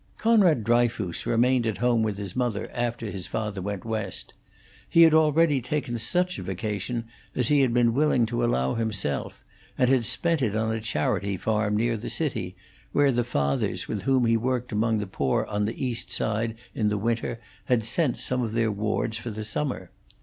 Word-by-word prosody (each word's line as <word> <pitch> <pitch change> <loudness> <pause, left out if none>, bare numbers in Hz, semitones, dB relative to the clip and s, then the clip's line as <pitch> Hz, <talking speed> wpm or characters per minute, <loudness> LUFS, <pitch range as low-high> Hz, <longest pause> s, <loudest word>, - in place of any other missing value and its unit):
Conrad 200 - +4
Dryfoos 115 -5 0
remained 120 +1 +3
at 110 - -1
home 120 -1 +2
with 105 -2 -1
his 100 -3 -5
mother 120 -5 -1
after 120 -3 -2
his 95 -3 -5
father 105 -3 -3
went 100 +1 -4
West. 110 -4 -4 0.6
He 165 - +7
had 160 -1 +6
already 155 -2 +4
taken 125 -1 -2
such 180 +9 0
a - - -5
vacation 105 +5 -3 0.3
as 125 -2 +1
he 145 - +4
had 130 -3 +3
been 120 -1 +3
willing 135 -3 +3
to 120 +1 -2
allow 65 - +1
himself, 105 -10 -3 0.3
and 125 - +3
had 125 -4 +3
spent 165 -3 +1
it 110 -5 0
on 110 0 0
a 110 - -3
charity 100 0 -1
farm 105 +1 0
near 115 +1 +1
the 110 - -6
city, 110 - -2 0.4
where 145 -1 +4
the 120 -1 +1
fathers 70 -12 -1
with - - -3
whom 130 -2 +2
he 115 0 +3
worked 125 +1 -2
among 110 +1 +1
the 105 - -2
poor 70 -9 0
on 105 0 -1
the 115 +5 -3
East 120 -2 -3
Side 110 +1 -1 0.2
in 105 -2 +1
the 105 - 0
winter 115 +2 -1 0.3
had 120 -3 +2
sent 130 +4 0
some 125 0 -2
of 115 -3 -2
their 115 -1 +1
wards 110 +2 -1
for 115 - -6
the 110 0 -5
summer. 125 +6 -3
115 Hz, 195 wpm, -26 LUFS, 105-125 Hz, 0.6 s, He